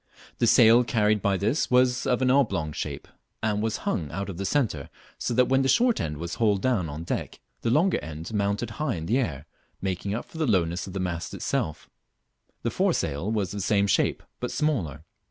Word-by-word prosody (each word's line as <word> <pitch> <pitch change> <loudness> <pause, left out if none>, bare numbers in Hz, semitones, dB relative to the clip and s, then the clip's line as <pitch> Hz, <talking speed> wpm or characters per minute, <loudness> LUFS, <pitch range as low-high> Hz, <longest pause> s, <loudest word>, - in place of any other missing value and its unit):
The - - +3
sail 115 +2 +7
carried 105 -3 +2
by 100 0 +1
this 110 - 0
was 125 0 +3
of 125 +1 +2
an 130 - +4
oblong 100 - +2
shape, - - -5 0.4
and 105 -2 +1
was 110 0 -1
hung 90 - -1
out 100 +5 -4
of 90 - -6
the 100 - -2
centre, 110 - 0 0.3
so 120 - -1
that 125 +1 +5
when 135 0 +3
the 135 - +1
short 235 - +3
end 75 -1 -3
was 85 +2 -5
hauled 105 -3 +2
down 110 -11 +1
on 75 +3 -6
deck - - -4 0.2
the 115 - 0
long 165 +10 +3
end 80 +5 -7
mounted 100 +2 -1
high 140 -7 0
in 80 -1 -5
the 120 +9 +2
air, 75 - -3 0.3
making 95 +1 -2
up 120 - -4
for 160 - -11
the 155 - +1
lowness 90 -4 +1
of 95 - -8
the 95 - -3
mast 85 -2 -3
itself. 80 - -2 0.8
The - - 0
foresail 80 +9 0
was 105 -4 -1
of 105 - -4
the - - -2
same 100 +1 +2
shape, 100 - +1 0.2
but - - -3
smaller. 95 - -1
105 Hz, 210 wpm, -26 LUFS, 85-125 Hz, 0.8 s, sail